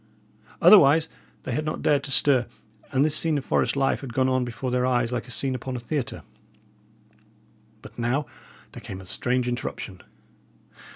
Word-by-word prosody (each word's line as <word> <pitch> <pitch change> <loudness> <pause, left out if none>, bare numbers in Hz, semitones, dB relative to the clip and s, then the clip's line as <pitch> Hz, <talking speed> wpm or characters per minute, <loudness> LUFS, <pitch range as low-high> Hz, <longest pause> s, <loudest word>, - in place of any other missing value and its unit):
Otherwise 160 -5 +7 0.4
they - - -5
had 150 +6 -1
not 155 - -4
dared 145 -2 +2
to 145 - -6
stir; 135 -2 +3 0.4
and 135 +2 +3
this 155 -1 +2
scene 160 -1 +2
of 135 - -5
forest - - +1
life 135 -1 +1
had 125 -5 -8
gone 130 0 +2
on 130 -1 +1
before 125 +1 -4
their 125 0 +1
eyes 125 -2 +1
like 125 0 -3
a - - -13
scene 130 +2 0
upon 130 +1 -5
a - - -3
theatre. 130 +1 -4 1.6
But - - -12
now 125 +5 0 0.5
there - - -10
came 95 - -8
a 95 - -11
strange 125 +6 -1
interruption. 110 -6 -5
130 Hz, 175 wpm, -25 LUFS, 120-140 Hz, 1.6 s, Otherwise